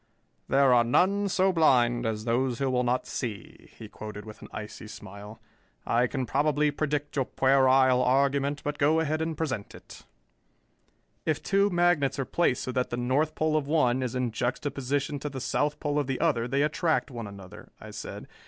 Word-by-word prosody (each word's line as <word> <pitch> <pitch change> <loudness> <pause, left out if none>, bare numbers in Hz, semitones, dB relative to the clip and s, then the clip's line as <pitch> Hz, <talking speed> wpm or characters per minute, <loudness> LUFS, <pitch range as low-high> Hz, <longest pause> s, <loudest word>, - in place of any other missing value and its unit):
"There 135 -1 +4
are 120 -1 +5
none 195 +11 +2
so 190 +1 +2
blind 120 -7 +3
as 110 0 -3
those 125 +1 0
who 135 0 0
will 125 -1 +1
not 125 +1 0
see," 115 -6 -6
he - - -9
quoted 105 -1 -9
with 110 -1 -11
an - - -10
icy 105 0 -8
smile. 105 +1 -10 0.5
"I 120 +2 +2
can 130 0 -3
probably 150 +4 +1
predict 145 0 -2
your 135 -3 +1
puerile 130 -1 +4
argument, 140 +2 +1
but 145 +1 -3
go 155 +2 +3
ahead 155 0 -1
and 160 -1 -2
present 130 -10 -4
it." - - -14 1.2
"If 155 -2 -1
two 200 +1 +2
magnets 175 -6 +2
are 135 - -1
placed 155 -6 0
so 130 - -3
that 125 0 -1
the 120 - -3
north 135 +6 0
pole 155 0 0
of 150 -3 0
one 130 -5 +2
is 125 -1 -3
in 125 -2 -1
juxtaposition 140 +4 -2
to 150 - -4
the 135 -2 -6
south 150 +3 -1
pole 145 0 -1
of 145 - -2
the 135 -1 -2
other, 115 0 +1
they 135 +3 +1
attract 155 0 0
one 115 -3 -6
another," 100 -2 -12
I - - -10
said. - - -8
135 Hz, 190 wpm, -27 LUFS, 120-150 Hz, 1.2 s, are